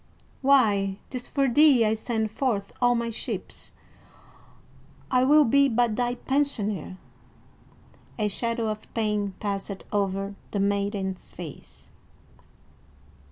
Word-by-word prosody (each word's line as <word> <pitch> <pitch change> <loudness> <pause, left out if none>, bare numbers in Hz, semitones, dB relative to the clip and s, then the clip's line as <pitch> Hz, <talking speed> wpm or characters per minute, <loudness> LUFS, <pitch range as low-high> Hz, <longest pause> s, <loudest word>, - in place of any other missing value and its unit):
"Why, 210 -8 +3
'tis 255 -2 -4
for 275 -1 +1
thee 265 -2 +5
I 215 - +2
send 220 -1 -2
forth 220 -5 -1
all 245 0 +4
my 235 0 -1
ships. 225 - -4 1.4
I 255 0 +4
will 295 +3 +6
be 280 +4 +4
but 235 -2 +1
thy 245 +1 0
pensioner." 215 - -1 1.2
A 215 -2 +1
shadow 230 +2 -1
of 215 0 -6
pain 210 -3 -1
passed 200 -1 -4
over 195 -1 -1 0.2
the 205 - -2
maiden's 200 -1 -1
face. 165 -5 -10
220 Hz, 115 wpm, -26 LUFS, 200-245 Hz, 1.4 s, will